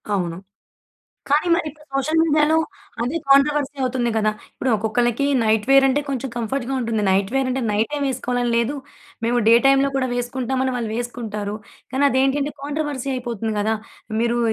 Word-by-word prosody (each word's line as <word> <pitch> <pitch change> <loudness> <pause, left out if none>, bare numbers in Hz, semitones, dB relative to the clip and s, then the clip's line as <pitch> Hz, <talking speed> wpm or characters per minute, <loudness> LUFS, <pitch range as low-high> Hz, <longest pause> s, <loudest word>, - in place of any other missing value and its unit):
అవును. 175 -4 -1 0.9
కానీ 295 +5 +2
మరిప్పుడు 305 -2 -4
సోషల్ 280 +4 +1
మీడియాలో 310 0 +3 0.5
అదే 260 +8 -1
కాంట్రవర్సీ 285 +1 +3
అవుతుంది 250 -2 0
గదా! 215 -1 +2 0.2
ఇప్పుడు 260 - -1
ఒక్కొక్కళ్ళకీ, 240 +5 0 0.2
నైట్ 220 -1 +2
వేరంటే, 270 +1 +5
కొంచెం 270 -1 -2
కంఫర్ట్‌గా 240 +3 -2
ఉంటుంది. 225 -3 -1
నైట్ 195 +1 +1
వేరంటే, 265 -1 0
నైట్ 210 +2 +1
టైమ్ 290 -1 -1
వేసుకోవాలని 245 -1 -1
లేదు, 235 +4 +1 0.5
మేము 240 +1 +2
డే 230 - +8
టైమ్‌లో 275 0 +4
కూడా 260 -1 0
వేసుకుంటాం, 245 +1 -2
అని 260 -1 -1
వాళ్ళు 230 -3 -3
వేసుకుంటారు. 220 -4 -4 0.4
కానదేంటి 270 0 +2
అంటే, 290 +1 -3
కాంట్రవర్సీ 290 -2 -3
అయిపోతుంది 230 -3 -3
గదా! 220 +2 +1 0.5
మీరు 235 +1 +1
255 Hz, 150 wpm, -21 LUFS, 230-275 Hz, 0.9 s, డే